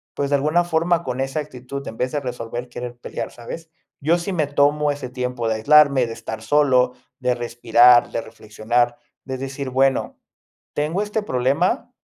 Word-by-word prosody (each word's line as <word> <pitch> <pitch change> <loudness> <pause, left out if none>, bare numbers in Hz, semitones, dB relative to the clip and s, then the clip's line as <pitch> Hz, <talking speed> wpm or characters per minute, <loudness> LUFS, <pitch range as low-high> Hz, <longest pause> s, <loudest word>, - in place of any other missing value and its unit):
pues, 140 -1 -1
de 140 - +3
alguna 155 +5 +2
forma 170 0 +1
con 125 -3 -4
esa 135 +3 -1
actitud, 140 -1 -8
en 115 - -7
vez 125 0 -1
de 145 - 0
resolver, 120 -1 -5
querer 120 0 -7
pelear, - - -6
¿sabes? 160 +8 -9 0.3
Yo 160 +5 +3
sí 175 +3 -4
me 155 -5 0
tomo 145 +1 +2
ese 140 -3 -5
tiempo 125 -2 -3
de 110 - +1
aislarme, 140 +2 +5
de 115 - -6
estar 110 -1 -7
solo, 130 -1 +3 0.3
de 125 -1 +1
respirar, 120 0 +4
de - - -2
reflexionar, 115 +2 -1 0.3
de 130 -1 -4
decir, 135 +1 -5
bueno, 135 +1 +1 0.5
tengo 155 +6 -1
este 210 +1 -2
problema, 130 -5 0
130 Hz, 175 wpm, -21 LUFS, 120-150 Hz, 0.5 s, aislarme